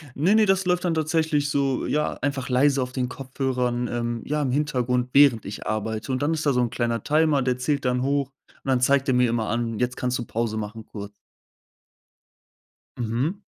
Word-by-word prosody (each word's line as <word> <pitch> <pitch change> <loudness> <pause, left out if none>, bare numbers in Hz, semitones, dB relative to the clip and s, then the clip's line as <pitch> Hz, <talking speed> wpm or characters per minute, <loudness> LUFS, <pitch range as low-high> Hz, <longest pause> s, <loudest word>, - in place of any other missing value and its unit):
Ne, 180 +9 +3
ne, 220 -1 +5
das 190 -1 +2
läuft 180 0 +1
dann 170 - +1
tatsächlich 155 -2 +1
so 140 -2 0
ja, 150 +1 0
einfach 140 -3 -2
leise 135 +1 +3
auf 125 - -6
den 125 -1 -2
Kopfhörern, 125 -2 -2
ähm, 120 -1 -3
ja, 150 0 -1
im 130 - -1
Hintergrund, 125 -3 0
während 135 -6 +6
ich 100 +2 -7
arbeite. 110 +2 -3
Und 130 +1 -1
dann 150 +3 +1
ist 155 - -3
da 140 - +3
so 125 - +2
'n 120 - +1
kleiner 115 -1 -2
Timer, 155 -2 +3
der 125 -1 0
zählt 140 +3 -1
dann 125 0 0
hoch 140 0 +1
und 140 0 -22
dann 130 - +3
zeigt 135 +2 +2
er 130 - +2
mir 125 -1 +4
immer 115 -2 -1
an: 115 -1 -2
„Jetzt 125 0 -1
kannst 125 0 -1
du 120 - -4
Pause 110 -1 -2
machen 110 +1 -6
kurz.“ 100 -1 -8 1.9
Mhm. 125 - -1
130 Hz, 205 wpm, -24 LUFS, 120-145 Hz, 1.9 s, während